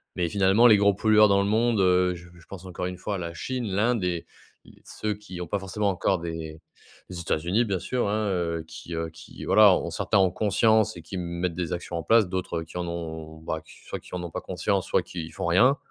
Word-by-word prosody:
Mais 85 -2 0
finalement 100 +6 +5
les 110 -3 +7
gros 100 0 +4
pollueurs 105 +1 +5
dans 100 0 +4
le 100 - -1
monde, 110 -1 +2
heu, 90 0 +3
j 85 - -11
je 85 - -17
pense 95 -2 -10
encore 90 -1 -5
une 90 - -6
fois 100 +1 -3
la 85 -2 -5
Chine, 125 +8 -4
l'Inde, 105 +3 +1
et 85 -2 -2 0.4
l - - -16
ceux 105 0 -3
qui 95 -4 -9
ont 90 - -5
pas 100 +5 -1
forcément 100 +2 -1
encore 95 0 0
des 80 -2 -6 0.5
les, 90 -2 -6
États-Unis 85 +8 0
bien 100 -4 -1
sûr, 125 +5 -1
hein, 105 0 0
heu, 85 -2 -1
qui, 80 +1 -8
heu, 80 0 -3
qui 80 0 -12
voilà - - +7
ont - - -3
certains 110 - 0
en 95 -2 +4
conscience 110 +2 +2
et - - -8
qui 90 - -8
m 90 - -2
mettent 85 0 -3
des 90 -3 -3
actions 85 0 -4
en 85 - -4
place 110 +2 +4
d'autres 90 -3 -3
qui 80 +2 -10
en 90 -1 -3
ont 80 -2 -6
bah, 80 0 -4 0.3
soit - - -5
qui - - -10
en - - -3
n'ont 85 -1 -6
pas - - -4
conscience 95 +1 -1
soit - - +2
qui 85 -2 -7
font - - -5
rien. 125 +11 +5
90 Hz, 240 wpm, -26 LUFS, 85-105 Hz, 0.5 s, les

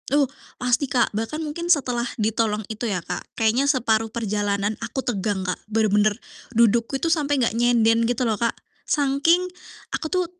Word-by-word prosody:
Uh 285 +1 +4 0.3
pasti 250 +2 +1
Kak 240 -4 +1
bahkan 225 +8 -3
mungkin 335 +3 -5
setelah 250 -7 +2
ditolong 215 -1 0
itu 225 +2 -3
ya 180 -4 -2
Kak - - -4 0.2
kayaknya 235 +5 +2
separuh 225 -5 +2
perjalanan 205 -2 -1
aku 230 +4 -4
tegang 200 -4 -1
Kak, 180 - -2
bener-bener 215 -1 +2 0.4
dudukku 235 +3 +3
itu 270 - -4
sampai 290 -3 0
gak 240 -4 +1
nyender 230 -1 +3
gitu 245 +1 0
loh 225 - +2
Kak. 230 - 0 0.3
Saking 290 +5 +3 0.5
aku 315 - -2
tuh 365 +1 +1
230 Hz, 160 wpm, -23 LUFS, 215-270 Hz, 0.5 s, Uh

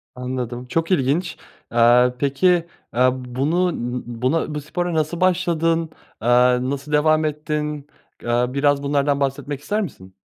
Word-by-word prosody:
Anladım, 125 -1 -4
çok 165 +6 -1
ilginç. 160 +2 +1 0.3
Aaa, 120 +1 +5
peki, 140 +5 +1 0.5
eee, 125 +2 +4
bunu 135 +8 -1
n 125 +1 -3
n - - -4
buna 130 +6 -1
bu 150 - -3
spora 175 +4 -3
nasıl 160 +3 -1
başladın? 165 -3 +1 0.3
Eee, 115 - -3 0.4
nasıl 140 +2 -5
devam 155 +1 +3
ettin? 150 -1 -3 0.4
Eee, 120 +1 +1
biraz 140 +1 +1
bunlardan 140 0 +1
bahsetmek 140 +1 -2
ister 210 +7 -1
misin? 95 - -8
145 Hz, 140 wpm, -21 LUFS, 125-160 Hz, 0.5 s, Aaa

